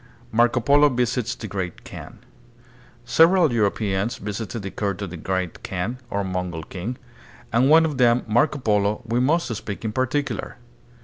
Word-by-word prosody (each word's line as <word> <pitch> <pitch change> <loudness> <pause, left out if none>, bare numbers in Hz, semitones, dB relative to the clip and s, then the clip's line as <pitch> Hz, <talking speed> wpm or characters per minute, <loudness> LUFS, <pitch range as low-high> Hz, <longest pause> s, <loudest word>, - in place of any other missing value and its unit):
Marco 120 +2 +3
Polo 145 +4 +5
Visits 125 -2 -1
the 115 - -8
Great 95 -4 -5
Kaan. - - -10 0.9
Several 165 +3 +5
Euro 105 -3 +3
peans 100 +3 -2
visited 105 +1 -5
the 95 - -5
court 100 -2 -2
of 95 - -5
the - - -6
Great 95 +1 -3
Kaan, 95 +7 -4
or 100 -2 -1
Mongol 90 -3 -3
king, 95 +10 -6 0.6
and 120 +2 +4
of - - +3
one 160 +1 +7
of 150 -4 -3
them, 120 0 +4
Marco 120 +8 +2
Polo, 105 -2 +1
we 115 +1 0
must 145 0 +1
speak 105 +1 -6
in 110 - -1
particular. 130 +4 -2
115 Hz, 170 wpm, -23 LUFS, 100-130 Hz, 0.9 s, one